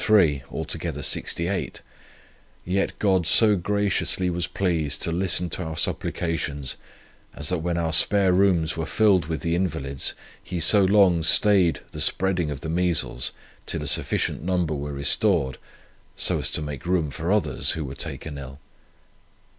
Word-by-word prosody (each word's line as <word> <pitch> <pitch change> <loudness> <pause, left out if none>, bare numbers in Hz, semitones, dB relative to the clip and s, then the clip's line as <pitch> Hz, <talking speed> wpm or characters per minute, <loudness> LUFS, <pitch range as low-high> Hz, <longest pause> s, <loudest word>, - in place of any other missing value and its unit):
3 85 -11 +3
altogether - - -4
68; 90 +3 -2 0.8
yet 95 +2 -2
God 95 -5 +1
so 105 +3 +8
graciously 95 -1 0
was 85 0 -3
pleased 80 -6 -2
to 85 - -1
listen 90 0 +1
to - - -2
our 80 -1 -6
supplications, 75 -8 -1 0.6
as 75 0 -3
that 90 - 0
when 85 +1 -3
our 80 -1 -2
spare 95 +2 +5
rooms 90 -4 +1
were 80 -2 -4
filled 100 -7 +2
with 80 -3 -4
the 85 - -2
invalids, 80 -7 -2 0.3
He 90 - -5
so 100 +5 +5
long 95 -3 +3
stayed 90 0 +4
the - - -5
spreading 90 -4 +1
of 70 -1 -6
the - - -6
measles 80 -7 0 0.4
till 80 -3 0
a - - -5
sufficient 70 - -1
number 90 -2 -1
were 75 0 -5
restored, 70 0 +1 0.6
so - - 0
as - - -3
to 75 - 0
make 75 0 -7
room 85 -5 0
for 85 +5 -4
others, 75 - +1
who 80 -2 -5
were 65 - -7
taken 70 +1 -6
ill. 70 +1 -10
85 Hz, 155 wpm, -23 LUFS, 75-95 Hz, 0.8 s, so